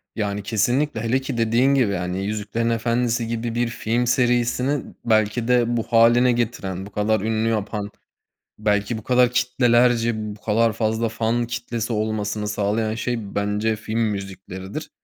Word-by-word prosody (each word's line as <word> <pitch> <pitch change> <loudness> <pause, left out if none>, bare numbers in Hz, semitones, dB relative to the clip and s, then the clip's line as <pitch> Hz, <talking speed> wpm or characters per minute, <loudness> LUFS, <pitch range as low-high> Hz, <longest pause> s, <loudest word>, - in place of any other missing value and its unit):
Yani, 105 -2 -2
kesinlikle, 120 +4 0
hele 115 +3 +1
ki, 130 -2 -4
dediğin 115 +4 +3
gibi, 125 -7 +2
yani, 90 +1 -2
Yüzüklerin 110 +2 -2
Efendisi 115 0 0
gibi 115 0 -3
bir 120 0 +1
film 115 +1 -1
serisini 125 +3 +1 0.2
belki 110 +1 +2
de 120 -1 +2
bu 115 - 0
hâline 120 +2 +4
getiren, 105 -6 -2
bu 100 - -11
kadar 105 +1 +1
ünlü 110 +1 0
yapan, 105 -1 -2 0.7
belki 105 +1 0
bu 110 - -9
kadar 125 0 +3
kitlelerce, 125 -1 +3 0.2
bu 105 - -20
kadar 115 +1 +2
fazla 110 +1 0
fan 115 +2 0
kitlesi 120 -1 -3
olmasını 105 -1 -2
sağlayan 105 +2 -1
şey, 115 -3 -4
bence 105 +2 0
film 110 +1 -4
müzikleridir. 95 -3 -4
115 Hz, 150 wpm, -22 LUFS, 105-120 Hz, 0.7 s, hâline